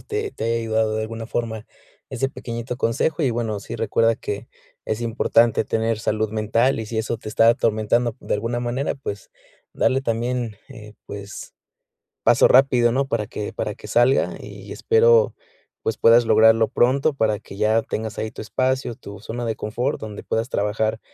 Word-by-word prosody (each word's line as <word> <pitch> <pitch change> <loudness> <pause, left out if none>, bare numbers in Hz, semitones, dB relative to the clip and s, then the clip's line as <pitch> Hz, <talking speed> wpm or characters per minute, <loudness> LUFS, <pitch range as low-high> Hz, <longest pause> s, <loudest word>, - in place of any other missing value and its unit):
te 425 -1 -4
te - - -8
haya 115 0 +1
ayudado 110 -1 0
de 110 - -1
alguna 115 +1 -5
forma 110 -2 -3 0.5
ese 130 +1 -1
pequeñito 120 -1 -6
consejo. 145 +7 0
Y, 135 - +2
bueno, 115 -3 -2
sí, - - -7
recuerda 115 0 +2
que 100 -1 -5 0.4
es 110 +1 -2
importante 115 -1 +2
tener 115 0 -1
salud 110 0 -1
mental 115 +4 +1
y, 110 - -5
si 110 0 -3
eso 110 +1 -1
te 110 - -9
está 115 +1 +4
atormentando 115 0 +1
de - - -2
alguna 115 +3 -2
manera, 120 +4 -2
pues, 100 -7 -7 0.4
darle 130 - +1
también, 120 -2 -2
eh, 110 -5 -12
pues, 100 0 -8 0.7
paso - - +5
rápido, 125 -2 +5
¿no?, 135 +3 0
para 110 -5 -1
que 105 - -5
para - - -3
que - - -12
salga 120 +3 +3
y - - -10
espero, 470 +1 +4 0.5
pues, 110 - -2
puedas 115 +1 +6
lograrlo 110 0 +5
pronto 135 +5 +2
para 110 -5 0
que 100 -2 -12
ya 110 +1 +3
tengas 110 -1 -4
ahí 110 - -2
tu - - -10
espacio, 130 +2 -1
tu 100 -1 -11
zona 120 +2 -5
de 110 -1 -2
confort, 120 +7 -2
donde 105 -2 -7
puedas 115 +2 -2
trabajar 110 +1 -1
115 Hz, 175 wpm, -22 LUFS, 110-125 Hz, 0.7 s, puedas